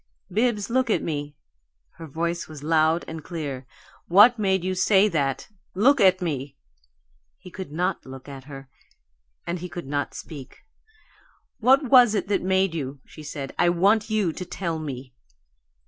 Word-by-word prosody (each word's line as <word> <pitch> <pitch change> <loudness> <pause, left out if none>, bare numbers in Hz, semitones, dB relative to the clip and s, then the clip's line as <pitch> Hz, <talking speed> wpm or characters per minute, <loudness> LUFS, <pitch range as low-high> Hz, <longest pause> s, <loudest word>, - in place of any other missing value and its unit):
"Bibbs, 215 0 0
look 260 0 +1
at - - +1
me!" 145 -2 -4 0.6
Her 165 - -9
voice 170 +3 -3
was 150 -2 -10
loud 160 +1 +2
and 160 -1 -7
clear. 145 -7 -6 0.4
"What 215 +7 +6
made 190 -3 +1
you 185 0 -1
say 190 +2 +4
that? 140 -8 -1 0.3
Look 255 +7 +4
at 185 -1 +4
me!" 140 -4 -4 0.8
He 180 - -13
could 185 -5 -8
not 175 +4 -1
look 130 0 -11
at 135 -2 -10
her, 135 -2 -10 0.8
and 170 +1 -3
he 180 +1 -7
could 170 0 -7
not 145 +1 -3
speak. 140 -4 -10 0.9
"What 260 +5 +5
was 245 -4 +6
it 200 - -1
that 205 - +1
made 190 -1 +1
you?" 140 -3 -5
she 155 - -13
said. 145 -2 -6
"I 175 - +4
want 200 +6 +2
you 210 -6 0
to 180 - -6
tell 170 -2 -4
me." 130 -4 -7
170 Hz, 160 wpm, -24 LUFS, 145-195 Hz, 0.9 s, What